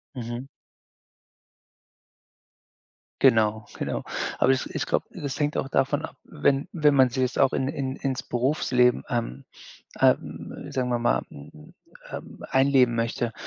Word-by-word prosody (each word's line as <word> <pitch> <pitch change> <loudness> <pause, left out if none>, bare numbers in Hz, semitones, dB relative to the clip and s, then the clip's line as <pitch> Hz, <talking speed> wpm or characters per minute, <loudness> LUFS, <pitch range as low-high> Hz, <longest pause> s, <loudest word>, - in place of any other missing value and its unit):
Mhm. 120 +1 -5 2.7
Genau, 110 -4 +4
genau. - - -2 0.3
Aber 130 - +4
ich 130 - 0
ich - - -1
glaube, - - 0
das 140 0 -5
hängt 150 0 0
auch 135 - -2
davon 140 +3 +1
ab, - - -14
wenn 140 -2 0
wenn 150 -4 +3
man 130 -2 +5
sich 130 +2 -1
das 125 - -2
auch 135 - +5
in 130 - 0
in 135 -1 -3
ins 135 -2 -2
Berufsleben, 125 -1 +2
ähm, 115 - -2 0.6
ähm, - - 0
sagen 125 -1 -1
wir 120 -1 +1
mal, 120 - +1
mhm, 75 +1 -13 0.4
ähm, - - -8
einleben 135 -2 +4
möchte, 115 0 -1
130 Hz, 140 wpm, -26 LUFS, 120-135 Hz, 2.7 s, man